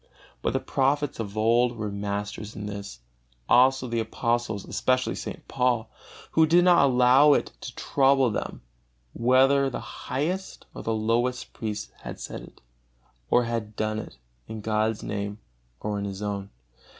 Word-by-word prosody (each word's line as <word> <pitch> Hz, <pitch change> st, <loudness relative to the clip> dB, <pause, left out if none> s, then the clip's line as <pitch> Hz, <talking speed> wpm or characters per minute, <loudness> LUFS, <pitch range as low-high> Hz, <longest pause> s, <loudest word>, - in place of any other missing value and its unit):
But -, -, 0 dB
the -, -, +1 dB
prophets 145 Hz, +1 st, 0 dB
of 105 Hz, -2 st, -5 dB
old 120 Hz, +2 st, +3 dB
were 105 Hz, -2 st, -3 dB
masters 100 Hz, +1 st, -4 dB
in 105 Hz, -, -6 dB
this; 100 Hz, -5 st, -7 dB, 0.5 s
also 130 Hz, +1 st, +5 dB
the 115 Hz, -1 st, -1 dB
apostles, 115 Hz, -1 st, -1 dB
especially 130 Hz, 0 st, 0 dB
St. -, -, -7 dB
Paul, 125 Hz, -3 st, 0 dB, 0.4 s
who 160 Hz, 0 st, +4 dB
did 175 Hz, +2 st, +5 dB
not 175 Hz, -5 st, +6 dB
allow 130 Hz, +3 st, +6 dB
it -, -, 0 dB
to 125 Hz, -, -7 dB
trouble 135 Hz, -3 st, +3 dB
them -, -, -4 dB, 0.5 s
whether 135 Hz, +3 st, +4 dB
the 125 Hz, -, -4 dB
highest 145 Hz, -, -4 dB
or -, -, -7 dB
the 115 Hz, -, -2 dB
lowest 120 Hz, +3 st, 0 dB
priest 105 Hz, -2 st, -5 dB
had -, -, -8 dB
said -, -, -6 dB
it, -, -, -15 dB, 0.7 s
or 120 Hz, -, +4 dB
had 115 Hz, -2 st, -3 dB
done 110 Hz, 0 st, -1 dB
it 85 Hz, -, -9 dB, 0.3 s
in 110 Hz, -1 st, -6 dB
God's 110 Hz, 0 st, 0 dB
Name 100 Hz, 0 st, -3 dB, 0.4 s
or 105 Hz, -1 st, -2 dB
in 100 Hz, -, -3 dB
his 100 Hz, +1 st, -5 dB
own. 100 Hz, -1 st, -3 dB
115 Hz, 155 wpm, -26 LUFS, 105-130 Hz, 0.7 s, not